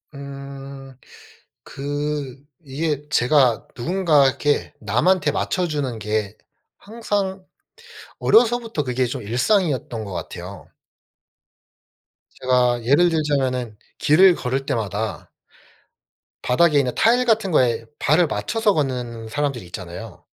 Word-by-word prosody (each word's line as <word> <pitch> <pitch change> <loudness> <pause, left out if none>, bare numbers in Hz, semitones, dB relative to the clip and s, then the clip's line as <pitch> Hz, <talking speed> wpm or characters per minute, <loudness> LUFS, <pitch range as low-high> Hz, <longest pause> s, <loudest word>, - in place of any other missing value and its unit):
음. 140 -1 -9 0.7
그 145 -1 -4 0.2
이게 150 +1 -3
제가 125 -2 +3
누군가 155 0 +3
이렇게 145 +2 0
남한테 145 - +2
맞춰주는게 115 - -2 0.4
항상 200 -4 -3 0.8
어려서부터 230 -8 +3
그게 125 0 0
좀 125 0 -5
일상이었던 125 - 0
것 100 - -8
같아요. - - -8 1.7
제가 125 -2 +2
예를 145 +8 +4
들자면은 130 -8 -1 0.2
길을 175 +4 +5
걸을 135 +2 -3
때마다 110 -2 -3 1.1
바닥에 150 +4 +3
있는 125 -3 0
타일 245 +3 +3
같은 220 -5 +1
거에 115 -6 +2
발을 160 +4 +3
맞춰서 205 - 0
걷는 125 -6 -3
사람들이 140 -4 -2
있잖아요. 90 -1 -9
140 Hz, 235 characters per minute, -22 LUFS, 120-165 Hz, 1.7 s, 길을